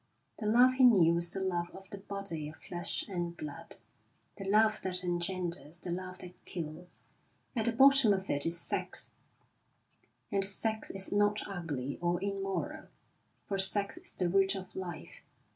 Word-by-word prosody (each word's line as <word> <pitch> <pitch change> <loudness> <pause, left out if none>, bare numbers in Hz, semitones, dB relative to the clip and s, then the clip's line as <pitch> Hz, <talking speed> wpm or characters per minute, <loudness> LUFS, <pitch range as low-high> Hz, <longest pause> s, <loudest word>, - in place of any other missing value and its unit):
The 215 - -3
love 245 +4 +6
he 260 0 +2
knew 190 -9 +6
was 170 0 +1
the 195 - -4
love 175 -2 -1
of 190 0 -12
the 200 - -7
body 195 -6 -4
of 155 - -12
flesh 175 +1 -4
and 175 -3 -4
blood, 145 -2 -7 0.6
the 195 - -8
love 215 +2 +3
that 185 -1 -1
engenders, 175 -2 -2
the 175 0 -6
love 185 +1 -5
that 180 0 -12
kills. 170 +1 -6 0.5
At 220 -2 0
the 235 - +3
bottom 270 -1 +7
of 190 -1 -1
it 145 0 -1
is 165 0 -1
sex, - - 0 1.2
and 195 -1 +1
sex 220 +3 +1
is 195 0 0
not 205 +1 +1
ugly 150 -9 -5
or 175 0 0
immoral, 195 -1 -3 0.6
for 195 -1 -3
sex 200 +1 +5
is - - -2
the 180 - 0
root 195 +2 +2
of 190 -1 -8
life. 180 -3 -7
190 Hz, 165 wpm, -31 LUFS, 175-200 Hz, 1.2 s, bottom